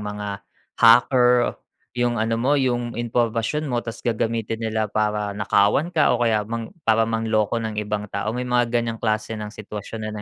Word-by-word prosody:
mga 105 0 -5 0.5
hacker, 125 +1 +5 0.5
yung 120 0 +1
ano 115 +1 0
mo 135 +5 +2
yung 120 -3 0
impormasyon 120 +5 -1
mo 120 -3 -1
ta's 115 -1 -7
gagamitin 115 -1 -1
nila 110 -1 -1
para 105 -1 -1
nakawan 100 - +2
ka 160 -7 +3
o 120 - 0
kaya 110 -3 +1
mang 115 0 -5 0.2
para 110 0 +4
manloko 110 0 0
ng 110 -1 -4
ibang 105 0 -3
tao 110 - -3
may 125 +2 -3
mga 120 -1 +1
ganyang 115 -1 -1
klase 110 0 -1
ng 105 -1 -6
sitwasyon 105 +1 -8
na - - -4
115 Hz, 170 wpm, -23 LUFS, 110-120 Hz, 0.5 s, hacker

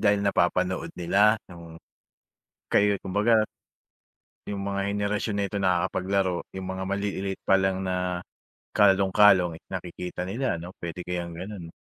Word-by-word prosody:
dahil 100 -1 +3
napapanood 90 -1 +1
nila 100 +5 +4 0.2
o 85 -1 -11 1.0
kayo 100 -1 +4
kumbaga. 105 +3 +3 1.0
Yung 100 -1 -4
mga 100 0 -2
henerasyon 105 0 -1
na - - +1
ito 100 - -5
nakakapaglaro, 95 0 0
yung 95 0 -6
mga 95 0 -3
maliliit 100 0 -2
pa 95 - +7
lang 95 0 +1
na 90 -1 -1 0.5
kalong-kalong, 95 -3 +5
eh, - - -59
nakikita 90 -1 -5
nila. 115 +7 -1
Ano 85 +2 -7
puwede 85 +1 -5
kayang 85 -2 -4
ganun? 90 -2 -7
95 Hz, 130 wpm, -26 LUFS, 90-100 Hz, 1.0 s, pa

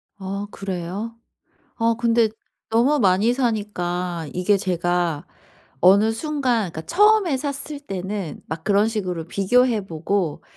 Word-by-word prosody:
아 200 +1 -5
그래요? 195 +4 -5 0.6
아 230 0 +2
근데 235 -1 +3 0.4
너무 245 +7 +3
많이 200 +2 +3
사니까 180 - -2
이게 185 +3 +2
제가 175 -4 -1 0.6
어느 200 +5 +6
순간 250 - -1
그러니까 160 - -6
처음에 410 -5 +4
샀을 285 +1 -5
때는 195 - -5
막 160 +1 -6
그런 205 +1 +3
식으로 180 -7 -3
비교해 220 +3 +2
보고 170 -1 -2
205 Hz, 250 characters per minute, -22 LUFS, 180-235 Hz, 0.6 s, 어느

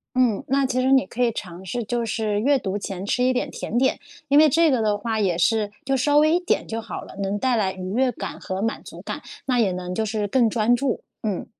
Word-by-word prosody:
嗯， 245 -5 +2
那 270 +1 +2
其 255 -1 0
实 260 +1 +3
你 265 -1 +4
可 250 - -3
以 235 -1 +3
尝 180 -3 -7
试 240 +6 -3
就 240 +2 -1
是 215 -2 -1
阅 280 +4 +3
读 195 -5 -3
前 195 -1 -5
吃 250 +4 +1
一 255 - +3
点 250 - -1
甜 235 - -3
点， 265 +1 +2 0.3
因 285 +1 +5
为 310 - +8
这 325 +2 +4
个 255 -4 +2
的 210 -1 +1
话 225 +1 -2
也 185 -5 +1
是 210 +3 +2 0.2
就 270 0 +2
稍 290 +3 +3
微 310 +2 +4
一 - - +4
点 355 - 0
就 225 0 -3
好 220 - -6
了， - - -12
能 195 +1 -1
带 255 +1 +1
来 195 -4 +1
愉 185 -1 -6
悦 255 +1 +2
感 - - -6
和 190 0 -4
满 225 +2 -2
足 - - -10
感， - - -6 0.2
那 255 -2 +1
也 210 -5 +2
能 180 0 -4
就 220 - 0
是 215 -1 -1
更 235 +1 +3
专 230 +2 +3
注， 260 0 -1 0.2
嗯。 210 -4 -2
230 Hz, 280 characters per minute, -23 LUFS, 205-255 Hz, 0.3 s, 为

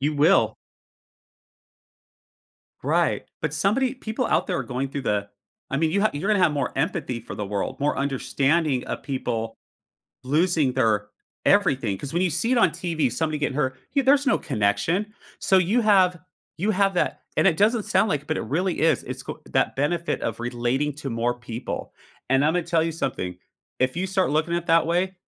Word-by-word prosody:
you 150 +2 0
will. 155 +7 +4 2.3
Right, - - +1 0.2
but - - -1
somebody 250 +6 +1
people 245 0 -3
out - - +1
there 180 - -1
are - - -1
going 130 +1 -3
through 140 +1 -5
the 100 -3 -1 0.4
I 135 - 0
mean, 160 +1 +1
you 200 - +1
ha 215 - +3
you're 155 +9 -2
gonna 205 -3 +3
have 160 - +4
more 140 -3 -1
empathy 135 -5 -1
for - - -8
the 105 - -4
world, 100 0 -3
more 145 0 0
understanding 140 +1 0
of - - -4
people 115 -5 -3 0.7
losing 155 0 +2
their 105 -3 +1 0.4
everything, 135 - +3
'cause 140 +2 -7
when 175 - +2
you 185 - +2
see 175 +11 0
it 255 - +3
on 185 -8 +4
TV, 165 -5 -1
somebody 155 +5 -1
getting 145 -2 -1
hurt, 130 -3 -1
yo 275 - +2
there's 275 +2 +4
no - - +3
connection, 135 - 0 0.3
so, 190 - +3
you 190 +7 +2
have 185 -4 +4 0.4
you 200 +6 0
have 195 -1 +2
that, 175 - 0 0.2
and - - +3
it 170 -5 +4
doesn't 220 +2 +3
sound 190 +3 +2
like, 145 -6 -2
but 155 - -1
it - - -3
really 175 - -1
is, 160 -4 +3
it's - - -7
c - - -3 0.2
that - - +1
benefit 165 +4 -1
of 115 0 -3
relating 120 +4 -1
to 145 -1 -6
more 120 +1 -1
people, 120 -1 -6 0.4
and 135 +1 +4
Imma 160 +4 +2
tell 165 0 +1
you 165 - -1
something, 90 - -3 0.4
if 130 0 +2
you 185 +2 -1
start 190 -3 +1
looking 160 +3 +1
at 175 0 -4
that 165 -1 +4
way, 180 +3 0
155 Hz, 190 wpm, -24 LUFS, 130-185 Hz, 2.3 s, will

